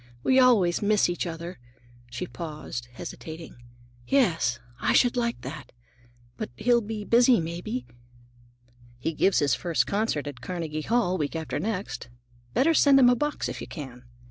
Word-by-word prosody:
We 260 Hz, 0 st, +4 dB
always 215 Hz, -9 st, +4 dB
miss 210 Hz, -2 st, +3 dB
each 175 Hz, -, -2 dB
other." 170 Hz, -1 st, -6 dB, 0.5 s
She 120 Hz, 0 st, -4 dB
paused, 150 Hz, -3 st, -6 dB
hesitating. 160 Hz, +5 st, -8 dB, 0.5 s
"Yes, 165 Hz, -, +2 dB, 0.2 s
I -, -, +1 dB
should 245 Hz, 0 st, +4 dB
like 235 Hz, -1 st, -1 dB
that. -, -, -8 dB, 0.7 s
But -, -, -4 dB
he'll 240 Hz, 0 st, +3 dB
be 215 Hz, -1 st, -5 dB
busy, 240 Hz, +1 st, +5 dB
maybe?" 165 Hz, -6 st, -4 dB, 1.1 s
"He 160 Hz, +7 st, -2 dB
gives 190 Hz, +5 st, +2 dB
his 140 Hz, -3 st, +3 dB
first 170 Hz, -3 st, +1 dB
concert 200 Hz, -8 st, -1 dB
at 140 Hz, -4 st, -7 dB
Carnegie 160 Hz, -3 st, -4 dB
Hall, 185 Hz, -2 st, +1 dB
week 150 Hz, +1 st, -2 dB
after 160 Hz, -1 st, -3 dB
next. 195 Hz, -, -4 dB, 0.5 s
Better 325 Hz, +5 st, +4 dB
send 280 Hz, -3 st, +6 dB
him 250 Hz, -2 st, +7 dB
a -, -, +4 dB
box 295 Hz, +4 st, -2 dB
if -, -, -6 dB
you -, -, -6 dB
can." 130 Hz, -6 st, -8 dB
175 Hz, 155 wpm, -26 LUFS, 150-235 Hz, 1.1 s, him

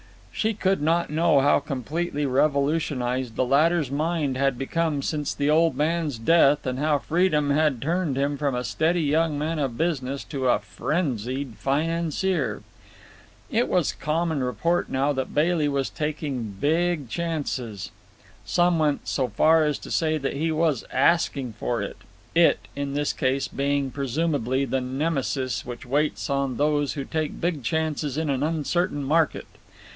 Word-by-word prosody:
She 220 Hz, 0 st, -1 dB
could 190 Hz, -4 st, +1 dB
not 165 Hz, +1 st, +1 dB
know 155 Hz, -2 st, +3 dB
how 145 Hz, +1 st, +4 dB
completely 145 Hz, +4 st, -3 dB
revolutionized 135 Hz, -3 st, 0 dB
the 130 Hz, -, +1 dB
latter's 150 Hz, +2 st, +2 dB
mind 150 Hz, -2 st, 0 dB
had 135 Hz, -1 st, +1 dB
become 150 Hz, +1 st, -1 dB
since 150 Hz, -1 st, -2 dB
the 145 Hz, +1 st, +1 dB
old 165 Hz, +1 st, +3 dB
man's 155 Hz, -3 st, 0 dB
death, 145 Hz, +3 st, +4 dB
and 130 Hz, 0 st, -2 dB
how 150 Hz, 0 st, +2 dB
freedom 155 Hz, -2 st, +1 dB
had 150 Hz, -3 st, +2 dB
turned 160 Hz, 0 st, -1 dB
him 140 Hz, +1 st, 0 dB
from 140 Hz, -2 st, -1 dB
a 125 Hz, -, -2 dB
steady 165 Hz, +5 st, +1 dB
young 155 Hz, +1 st, +1 dB
man 155 Hz, +2 st, -2 dB
of 130 Hz, -5 st, -2 dB
business 140 Hz, -5 st, -1 dB
to 135 Hz, -4 st, -3 dB
a 120 Hz, -, +4 dB
frenzied 130 Hz, -, -3 dB
financier. 165 Hz, +2 st, -1 dB, 0.9 s
It 235 Hz, +3 st, +2 dB
was 175 Hz, -5 st, +2 dB
common 160 Hz, 0 st, -1 dB
report 130 Hz, +8 st, 0 dB
now 135 Hz, +2 st, +1 dB
that 130 Hz, -1 st, -4 dB
Bailey 155 Hz, 0 st, +2 dB
was 140 Hz, -2 st, -1 dB
taking 145 Hz, -8 st, -3 dB
big 160 Hz, -1 st, +1 dB
chances. 130 Hz, -, -3 dB, 0.5 s
Some 175 Hz, -1 st, +2 dB
went 150 Hz, -2 st, 0 dB
so 130 Hz, -3 st, 0 dB
far 160 Hz, +4 st, +4 dB
as 150 Hz, -2 st, 0 dB
to -, -, -10 dB
say 155 Hz, -1 st, +1 dB
that 140 Hz, -2 st, -2 dB
he 160 Hz, +3 st, -1 dB
was 155 Hz, -5 st, +1 dB
"asking 135 Hz, -3 st, +2 dB
for 120 Hz, -4 st, -1 dB
it," -, -, -6 dB, 0.4 s
"it" -, -, +3 dB
in 140 Hz, 0 st, -3 dB
his 145 Hz, 0 st, 0 dB
case 130 Hz, +1 st, 0 dB
being 140 Hz, -1 st, -1 dB
presumably 140 Hz, -1 st, 0 dB
the 135 Hz, -1 st, -1 dB
Nemesis 135 Hz, -1 st, -1 dB
which 120 Hz, -1 st, -8 dB
waits 145 Hz, +4 st, 0 dB
on 140 Hz, -3 st, -1 dB
those 145 Hz, -1 st, +1 dB
who 140 Hz, -, -4 dB
take 155 Hz, -2 st, -3 dB
big 170 Hz, -4 st, -1 dB
chances 155 Hz, +1 st, -1 dB
in 155 Hz, -2 st, 0 dB
an 135 Hz, -1 st, -1 dB
uncertain 160 Hz, 0 st, 0 dB
market. 155 Hz, +3 st, +1 dB
145 Hz, 155 wpm, -25 LUFS, 135-160 Hz, 0.9 s, how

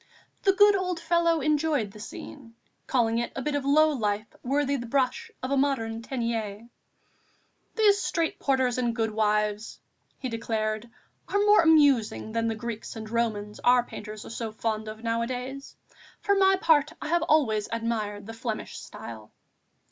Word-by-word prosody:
The 390 Hz, -, +4 dB
good 410 Hz, +1 st, +6 dB
old 365 Hz, -3 st, -1 dB
fellow 335 Hz, -1 st, +2 dB
enjoyed 300 Hz, -6 st, +1 dB
the 210 Hz, -, -13 dB
scene, 230 Hz, +2 st, -10 dB, 0.3 s
calling 230 Hz, -3 st, +2 dB
it 235 Hz, -, -2 dB
a 270 Hz, -, -3 dB
bit 300 Hz, -, -1 dB
of 285 Hz, -1 st, -1 dB
low 310 Hz, +3 st, +4 dB
life 215 Hz, -5 st, -1 dB, 0.2 s
worthy 280 Hz, +2 st, 0 dB
the 240 Hz, -3 st, -4 dB
brush 255 Hz, 0 st, 0 dB
of 255 Hz, -, -3 dB
a 280 Hz, -, +2 dB
modern 230 Hz, -5 st, 0 dB
Teniers. 230 Hz, -4 st, -3 dB, 1.1 s
"These 410 Hz, -3 st, +4 dB
street 330 Hz, -1 st, -1 dB
porters 260 Hz, -3 st, +1 dB
and 240 Hz, -2 st, 0 dB
goodwives," 210 Hz, -1 st, 0 dB, 0.4 s
he 260 Hz, -, -4 dB
declared, 220 Hz, -1 st, -2 dB, 0.4 s
"are 405 Hz, -, 0 dB
more 420 Hz, 0 st, +7 dB
amusing 285 Hz, -10 st, +3 dB
than 230 Hz, 0 st, 0 dB
the 225 Hz, -, -1 dB
Greeks 230 Hz, 0 st, -6 dB
and 220 Hz, -1 st, -7 dB
Romans 215 Hz, -3 st, -2 dB
our 245 Hz, 0 st, +4 dB
painters 215 Hz, -2 st, -8 dB
are -, -, -9 dB
so 230 Hz, -1 st, -4 dB
fond 220 Hz, 0 st, -3 dB
of 215 Hz, +1 st, -8 dB
nowadays. 250 Hz, +4 st, -3 dB, 0.4 s
For 405 Hz, -, +1 dB
my 385 Hz, -1 st, +5 dB
part, 315 Hz, -5 st, +3 dB
I -, -, -5 dB
have 345 Hz, +1 st, +2 dB
always 250 Hz, -10 st, +2 dB
admired 220 Hz, -3 st, -2 dB
the 225 Hz, -, -7 dB
Flemish 225 Hz, -1 st, -5 dB
style." 110 Hz, -2 st, -10 dB
235 Hz, 160 wpm, -27 LUFS, 220-290 Hz, 1.1 s, more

